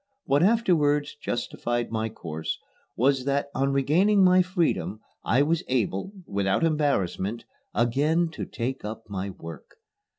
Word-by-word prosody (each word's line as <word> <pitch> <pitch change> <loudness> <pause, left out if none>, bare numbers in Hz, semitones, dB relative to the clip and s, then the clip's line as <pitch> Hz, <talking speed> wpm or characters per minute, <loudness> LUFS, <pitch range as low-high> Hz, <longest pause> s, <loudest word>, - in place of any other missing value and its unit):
What 140 +1 +3
afterwards 165 -9 +3
justified 120 0 -2
my 110 0 -1
course 80 -7 -5 0.4
was 130 +1 +2
that 140 0 0
on 135 +1 +1
regaining 180 +9 +3
my 185 0 +6
freedom 175 - 0 0.2
I 130 +5 +3
was 160 +2 +1
able, 120 - -1
without 100 +3 0
embarrassment, 120 - 0 0.3
again 150 +8 +2
to - - -5
take 130 +3 -4
up 110 +2 -6
my 100 0 -3
work. 80 -5 -10
135 Hz, 130 wpm, -26 LUFS, 110-160 Hz, 0.4 s, my